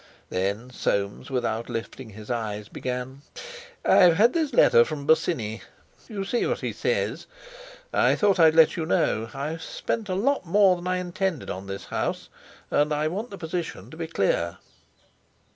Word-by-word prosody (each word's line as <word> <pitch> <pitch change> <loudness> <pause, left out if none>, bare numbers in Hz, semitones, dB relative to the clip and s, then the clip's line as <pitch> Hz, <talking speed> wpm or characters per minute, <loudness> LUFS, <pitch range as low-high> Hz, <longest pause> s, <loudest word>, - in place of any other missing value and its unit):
Then 100 +7 -2
Soames, 100 -2 -2
without 115 -3 -2
lifting 115 +1 -6
his 105 +2 -9
eyes, 105 -3 -3
began: 125 +2 -5 0.6
"I've 175 -2 +6
had 230 +4 +5
this 315 -4 0
letter 120 - +6
from 145 +1 -5
Bosinney. 140 -9 +1 0.5
You 200 -3 -4
see 240 +4 0
what - - -2
he - - -3
says; 485 +1 -1 0.7
I - - +4
thought 200 -3 +2
I'd 160 -1 +6
let 160 -1 +6
you 160 -3 -3
know. 110 -8 +1
I've 150 +4 -4
spent 215 +4 -4
a 185 - 0
lot 275 +9 +1
more 190 +1 +4
than 175 0 -7
I 185 0 +1
intended 180 -2 -2
on 95 +1 -7
this 100 0 -6
house, - - -3 0.4
and 150 +1 +2
I 150 +1 +1
want 210 +8 -4
the 200 - -8
position 170 0 -5
to - - -10
be 165 -1 -4
clear." 90 - 0
155 Hz, 165 wpm, -25 LUFS, 115-185 Hz, 0.7 s, I've